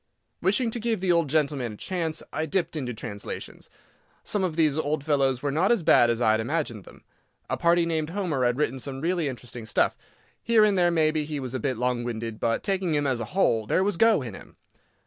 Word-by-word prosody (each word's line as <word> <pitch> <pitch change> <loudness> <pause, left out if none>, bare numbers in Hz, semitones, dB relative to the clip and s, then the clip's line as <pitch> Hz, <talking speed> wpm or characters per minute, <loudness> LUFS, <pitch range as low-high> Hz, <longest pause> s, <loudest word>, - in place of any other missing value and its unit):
Wishing 225 +5 +2
to 235 - -3
give 225 -2 -1
the 185 -1 +1
old 170 -4 +2
gentleman 140 -6 0
a - - -11
chance, 165 - -2
I 160 +1 -2
dipped 170 +1 -1
into 130 -5 -3
translations. 105 -3 -7 0.5
Some 205 -2 -1
of 175 -4 -1
these 155 -3 +2
old 150 -1 -1
fellows 135 -4 +1
were 145 - 0
not 170 +9 +2
as 230 -7 +2
bad 120 -5 +5
as 115 -1 0
I 110 -3 +3
had 110 - +2
imagined 120 - -2
them. - - -15 0.5
A - - +2
party 170 0 +3
named 160 -2 -1
Homer 170 -8 -1
had 120 0 +1
written 135 -3 -1
some 135 +1 -5
really 170 +1 0
interesting 120 -3 -7
stuff. - - +1 0.5
Here 230 -2 +4
and 210 -2 +3
there, 175 -2 +3
maybe, 155 -2 +2
he 150 -1 -4
was 130 -2 -5
a 130 - -2
bit 130 0 -2
long 125 0 0
winded, 115 -2 -5
but, 115 - 0
taking 190 -5 0
him 145 0 +1
as 130 -3 0
a 115 - -3
whole, 115 - +1
there 185 - +2
was 205 -1 0
"go" 220 -5 +4
in 115 -5 -7
him. - - -13
150 Hz, 225 wpm, -26 LUFS, 125-175 Hz, 0.5 s, bad